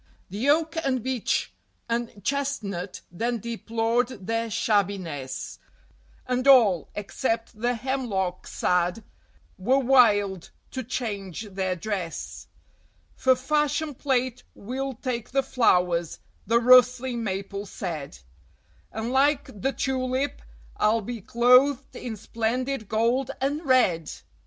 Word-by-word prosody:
The 220 +8 -1
Oak 320 +2 +2
and 255 -4 0
Beech 260 -3 -1 0.3
and 230 -4 -3
Chestnut 215 -10 -2
then 235 +7 -1
deplored 230 0 -1
their 230 +2 -1
shabbiness, 190 - -1 0.7
And 255 +1 -1
all, 220 - +6
except 225 +1 -3
the 245 +1 +1
Hemlock 220 -8 -2
sad, 180 +4 0 0.6
were 250 +8 +3
wild 210 -8 +3 0.2
to 260 - -3
change 215 -6 -4
their 185 -1 -1
dress. 180 -2 -5 0.7
"For 260 -1 +4
fashion 295 +3 0
plate 255 -2 -1
we'll 265 +4 -4
take 240 -1 -4
the 270 +1 +1
flowers," 180 - +2 0.3
the 230 +1 +4
rustling 250 0 +5
Maple 200 0 -4
said, 160 - -5 0.7
"And 220 +2 -3
like 275 -6 +1
the 270 - +1
Tulip 260 +1 -1 0.4
I'll 220 +2 +3
be 230 +1 -6
clothed 250 +5 +4
in 235 -3 -5
splendid 230 +2 -2
gold 235 +4 +1
and 285 +4 -1
red!" 220 - +2
235 Hz, 110 wpm, -26 LUFS, 200-260 Hz, 0.7 s, all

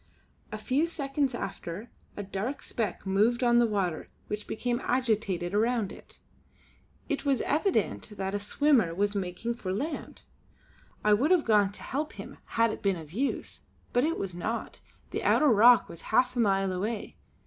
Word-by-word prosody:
A 215 - -4
few 270 +9 +1
seconds 275 -4 -1
after, 195 0 -6 0.3
a 205 - -3
dark 200 +8 -4
speck 210 -6 -3
moved 215 +6 +2
on 240 -1 +5
the 240 - +4
water 190 -6 -2 0.2
which 210 0 -4
became 240 +2 -2
agitated 215 -8 0
around 225 -1 +1
it; - - -14 0.9
it 290 - -2
was 275 -3 +2
evident 315 - 0
that 190 0 -2
a 205 - 0
swimmer 225 - +2
was 205 +2 +1
making 195 +4 -3
for 210 -6 -5
the 190 - -1
land. 300 +8 -5 0.8
I 210 - +5
would 260 +9 +3
have 360 -4 +4
gone 210 -3 +4
to - - -9
help 295 +3 -3
him - - -10 0.2
had 230 -1 +4
it - - -6
been 195 -2 +2
of 160 -3 -10
use; 260 +9 -2 0.3
but 245 - +3
it 325 +3 0
was 195 -2 -3
not, 215 +7 -4 0.3
the - - -2
outer 300 - +4
rock 235 +1 +6
was 170 - -9
half 250 +3 +3
a - - -1
mile 195 -3 +2
away. 210 +4 -3
220 Hz, 175 wpm, -29 LUFS, 195-255 Hz, 0.9 s, rock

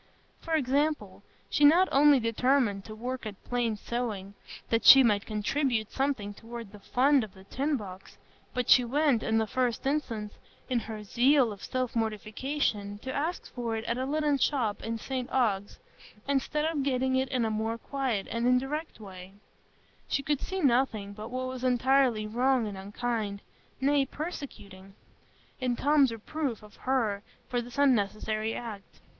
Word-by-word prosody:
For 325 - -2
example, 295 +2 0 0.3
she - - 0
not 340 +6 +7
only 285 0 +6
determined 230 -3 +1
to 215 - -8
work 250 +1 -4
at 205 -2 -9
plain 240 -3 -1
sewing, 210 -3 -4 0.4
that 230 0 +2
she 270 -1 +10
might 205 -4 +2
contribute 220 +1 -1
something 265 -7 -1
toward 230 -1 -9
the 210 - -12
fund 265 +5 +3
in 215 - -6
the 190 - -14
tin 275 +8 -1
box, 195 -4 -10 0.3
but 250 -2 -2
she 250 - +7
went, 275 -1 +2
in 220 - +1
the 220 - +2
first 250 +1 -1
instance, 230 -7 -2 0.3
in 250 -2 +1
her 220 -2 -7
zeal 250 +3 +3
of 200 - -10
self 255 -2 -2
mortification, 215 -1 -2
to 260 - -4
ask 320 +5 -3
for 235 -3 -3
it 220 - -4
at 235 +2 -1
a 260 - -2
linen 295 -1 +1
shop 235 -8 0
in 230 0 -3
St 255 +2 -4
Ogg's, 205 -6 0 0.5
instead 280 +2 0
of 320 -3 0
getting 260 -1 +1
it 260 0 +1
in 250 -4 0
a 220 - -1
more 220 +1 -1
quiet 250 -5 -2
and 230 +1 0
indirect 270 +5 0
way; 190 -2 -10 0.8
and 275 - -7
could 295 -3 0
see 380 0 -3
nothing 235 -6 +1
but 215 +2 -8
what 255 +1 -3
was 255 -1 -5
entirely 255 -2 +3
wrong 245 +2 +1
and 205 -2 -5
unkind, 205 +1 -3 0.4
nay, 275 0 +2
persecuting, 205 - -8 0.6
in 250 -2 0
Tom's 285 -1 +3
reproof 235 +1 -4
of 210 -1 -15
her 230 -6 0 0.3
for 245 -2 -1
this 240 +2 -10
unnecessary 215 -4 +1
act. 215 -5 -8
245 Hz, 165 wpm, -29 LUFS, 215-270 Hz, 0.8 s, she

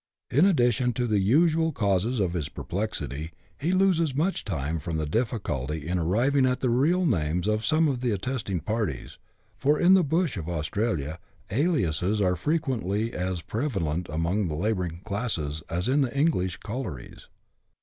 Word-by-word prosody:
In 150 +9 +5
addition 125 - +2
to 125 +2 -1
the 105 -3 +2
usual 160 - +3
causes 105 - 0
of 90 -4 0
his 85 -5 -2
perplexity, 80 - -4 0.3
he 160 +5 0
loses 180 -6 +2
much 170 +7 0
time 80 -3 -2
from 80 +2 -3
the 80 - -1
difficulty 75 - -2
in 90 +1 0
arriving 120 - +2
at 125 0 0
the 125 - +1
real 165 +9 +3
names 90 - 0
of 110 0 +1
some 155 +3 +3
of 130 -4 -1
the 125 - 0
attesting 105 -3 -2
parties, 105 - -3 0.4
for, 145 +4 +2
in 180 +2 +6
the 190 -2 +6
bush 160 - 0
of 85 -3 -5
Austrailisi,' 80 -1 -2 0.3
aliases 105 - +1
are 90 -3 +2
fre 150 - 0
quently 115 - -1
as 90 -1 -2
prevalent 90 - -2
among 85 +6 0
the 75 - -3
labouring 90 -2 -2
classes 100 -9 -2
as 90 +4 -1
in 140 +3 +3
the 135 0 -1
English 115 - +1
collieries. 105 - -7
105 Hz, 165 wpm, -26 LUFS, 85-135 Hz, 0.4 s, in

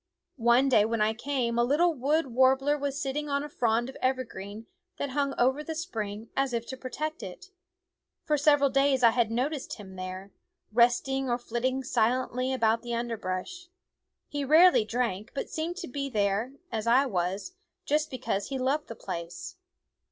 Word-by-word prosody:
One 240 +3 +5
day 230 -6 +5
when 225 +1 -1
I 215 +1 +2
came 235 -1 -1
a - - +5
little 315 +7 +3
wood 300 +4 +1
war 260 +2 +6
bler 290 +2 +1
was 285 -1 -3
sitting 295 +1 -2
on 280 0 0
a 295 - -6
frond 235 -3 +1
of 265 - -9
evergreen 225 -5 -3 0.3
that 280 - -3
hung 280 0 0
over 265 +4 +2
the 320 +1 -5
spring 220 - -5
as 270 -2 0
if 235 -1 -1
to 260 - -4
protect 305 +5 -5
it. 385 +1 -9 0.7
For 305 - +1
several 290 -1 +4
days 275 -1 +3
I 230 - +8
had 235 -1 +1
noticed 260 +5 -2
him 190 -3 -11
there, 185 +2 -6 0.4
resting 250 +3 +2
or 240 - +2
flitting 250 +2 -2
silently 255 +1 0
about 230 -3 +2
the 240 -1 -3
underbrush. 230 - -4 0.6
He 290 -1 -3
rarely 315 -3 +6
drank, 225 -2 -2
but - - -4
seemed 330 +3 -3
to 375 - -5
be 275 +1 -4
there, 210 +2 0 0.2
as 225 -1 -3
I 255 +4 +5
was, 190 - -2 0.3
just 305 +1 +1
because 205 -6 -2
he 270 - -3
loved 270 +4 0
the 230 - -7
place. 185 - -6
255 Hz, 175 wpm, -28 LUFS, 225-285 Hz, 0.7 s, I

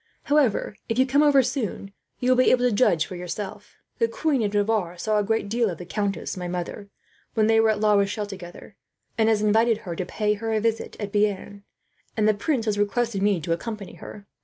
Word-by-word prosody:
However, 275 -8 +1
if 225 - -1
you 260 - +5
come 275 +2 +3
over 285 -3 +5
soon, 230 -6 -3 0.3
you 250 +1 +2
will - - +5
be - - +4
able 250 -1 +4
to - - +1
judge 175 -9 +3
for 185 - -8
yourself. 200 +3 -7 0.2
"The 230 - +3
Queen 275 +3 0
of 205 -2 0
Navarre 205 -4 0
saw 215 +3 0
a - - +1
great 225 0 0
deal 230 +1 +1
of 170 - -5
the 180 - -8
countess, 200 +2 -3
my 180 -1 -5
mother, 180 +3 -5 0.5
when 220 -2 +3
they 225 0 +4
were 225 0 +4
at 215 -1 +1
La 210 0 +3
Rochelle 200 +1 +1
together; 190 0 -10 0.4
and 220 -1 +3
has 215 -1 +2
invited 220 +2 +3
her 175 -2 -4
to 185 - -2
pay 210 +3 -1
her 225 +2 -3
a 215 - +2
visit 225 +1 -2
at 205 -2 -4
Bearn, 205 -1 -1 0.5
and 215 -1 +3
the 215 - +5
prince 230 +3 -1
has 210 -2 0
requested 205 0 0
me 200 -3 +2
to 165 +2 -1
accompany 210 +2 -6
her. 205 -1 -11
210 Hz, 225 wpm, -24 LUFS, 200-230 Hz, 0.5 s, you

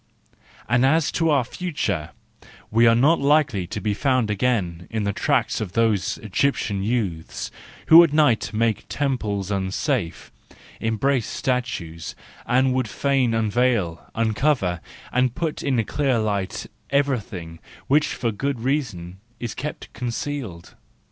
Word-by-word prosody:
And 120 +2 +3
as 155 +3 +3
to 165 -1 +1
our 140 -4 +3
future, 115 - -3 0.6
we 115 +2 +5
are 115 - +6
not 145 +8 +4
likely 140 - +2
to - - -4
be 105 -1 -1
found 130 -1 +1
again 95 -6 -1
in 110 -2 -2
the 100 0 -1
tracks 125 -1 0
of 100 -4 -4
those 110 -5 +1
Egyptian 110 -3 0
youths 100 -7 -2 0.4
who 165 +2 +11
at 165 - +1
night 125 -9 +3
make 110 0 +1
the - - -21
temples 105 -9 -2
unsafe, 95 - -2 0.5
embrace 115 +2 0
statues, 105 -11 -3 0.3
and 130 +1 +3
would 130 -2 0
fain 130 -1 +1
unveil, 110 -6 +1
uncover, 110 - +1 0.3
and 125 -1 +2
put 165 -2 -2
in 125 -6 +1
clear 135 -1 +1
light, 100 -4 -2 0.2
everything 110 - -1 0.3
which 150 +2 +3
for 115 -2 -2
good 135 +5 -2
reasons 110 - -2 0.2
is 120 -2 -4
kept 150 +3 -6
concealed. 120 -7 -5
115 Hz, 135 wpm, -23 LUFS, 100-140 Hz, 0.6 s, who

